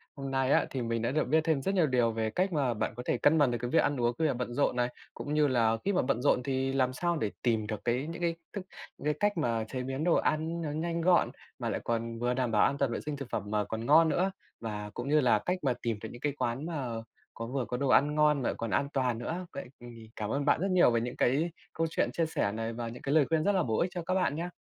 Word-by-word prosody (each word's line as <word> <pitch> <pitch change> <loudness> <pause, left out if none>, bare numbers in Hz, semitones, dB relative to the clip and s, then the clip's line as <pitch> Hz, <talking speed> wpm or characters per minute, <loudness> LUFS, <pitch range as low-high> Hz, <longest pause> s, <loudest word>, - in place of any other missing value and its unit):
hôm 135 -1 -5
nay 135 0 +1
á, - - +4
thì 130 - -3
mình 115 -1 -1
đã 115 - 0
được 155 +3 +1
biết 160 +4 +3
thêm 160 -4 +1
rất 195 +7 -1
nhiều 175 -5 +4
điều 125 -3 +2
về 110 0 -1
cách 185 - 0
mà 135 -6 +1
bạn 110 0 -2
có 125 - -6
thể - - +1
cân 155 +2 +4
bằng 145 -5 +4
được 120 - -1
cái 120 - -2
việc - - +4
ăn 145 -1 0
uống 120 0 +2
khi 160 - +3
bạn 135 -5 -1
bận 125 -1 -3
rộn 140 0 +1
này. 120 0 +1 0.2
Cũng 145 - -5
như 150 -1 +4
là 115 -4 +2
khi 200 - +2
mà 180 - +3
bận 125 -1 0
rộn 125 - +3
thì 135 0 -1
làm 130 -1 +1
sao 170 +5 0
để 110 -7 -1
tìm 110 -3 +1
được 105 -2 -4
cái 125 +4 0
những 165 +1 -6
cái 170 -1 +1
c 170 +5 -22 0.4
những - - -10
cái 150 - +2
cách 205 -2 +1
mà 115 -7 0
chế 130 +2 -4
biến 135 +3 -3
đồ 170 0 +3
ăn 160 +2 0
nó 155 -3 -3
nhanh 165 +2 -2
gọn, 175 +1 +4 0.3
mà - - -2
lại - - -1
còn 115 0 -2
vừa 120 +1 +1
đảm 125 -2 -1
bảo 105 - +4
an 140 - 0
toàn 140 -3 +1
vệ - - -2
sinh 150 -1 -3
thực 140 -3 -7
phẩm 105 - -2
mà 105 -1 +1
còn 110 +2 -5
ngon 160 +4 +6
nữa. 185 +4 +1 0.3
Và 105 -2 -5
cũng 120 +3 -4
như 150 +1 +5
là 125 -6 +4
cách 180 +1 +1
mà 130 -3 +2
tìm 115 -3 -1
được 110 - -5
những 120 - -11
cái 145 - 0
quán 125 +3 -2
mà 155 -6 -3 0.5
có 115 - -6
vừa 130 0 -2
có 125 - -3
đồ 135 +1 0
ăn 145 +3 +4
ngon 150 -2 +3
mà 120 - 0
lại - - -1
còn 115 - -3
an 140 +5 +1
toàn 125 -3 +1
nữa, 165 +10 -4
vậy 140 - -6
thì 115 -2 -11
cảm 105 -1 -4
ơn 140 +4 -1
bạn 145 - +3
rất 195 0 0
nhiều 180 -8 +5
về 115 -1 +1
những 120 +1 -4
cái 150 +7 +2 0.2
câu 165 0 0
chuyện - - 0
chia 165 - +1
sẻ 155 -10 -1
này, 115 +2 -3
và 115 0 -4
những 115 +2 -8
lời 145 +1 +4
khuyên 160 -1 +2
rất 205 - +3
là 190 -3 +2
bổ 110 -6 0
ích 175 - +1
cho 180 - -3
các 185 - 0
bạn 185 -6 +1
nha. 170 +3 -3
135 Hz, 305 wpm, -30 LUFS, 120-160 Hz, 0.5 s, ngon